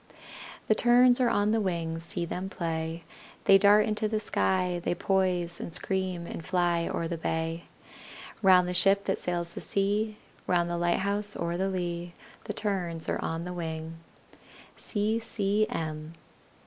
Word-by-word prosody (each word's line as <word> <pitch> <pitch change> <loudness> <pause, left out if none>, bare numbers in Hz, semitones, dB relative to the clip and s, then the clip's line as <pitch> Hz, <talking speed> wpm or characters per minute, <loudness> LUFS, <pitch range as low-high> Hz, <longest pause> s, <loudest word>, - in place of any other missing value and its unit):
The - - +5
Terns 245 +2 +5
are 245 - +3
on 205 -1 +1
the 225 0 +2
wing, 165 -4 -2
See 170 +1 -1
them 185 +3 -5
play! 165 -1 -4 0.4
They 195 0 +6
dart 205 +1 +6
into 215 0 -1
the 215 0 -1
sky, 185 -4 0
They 175 - 0
poise, 180 -2 0
and 165 - +1
scream, 185 -2 -2
and 165 - -7
fly 175 -1 0
O'er 165 - -2
the 170 -1 -4
bay; 165 +1 -3 0.8
Round 185 -3 +5
the 180 - -2
ship 195 +2 +4
that 195 - -1
sails 175 -1 -3
the - - -7
sea, 210 +2 -1 0.3
Round 175 -1 +1
the 175 - -1
lighthouse 200 +4 +2
o'er 170 0 -2
the 190 +2 -1
lea 175 -2 -4 0.3
The - - -4
Terns 180 -6 -1
are - - -1
on 165 +1 -3
the 180 +1 -5
wing! 160 -1 -5
180 Hz, 150 wpm, -28 LUFS, 170-200 Hz, 0.8 s, They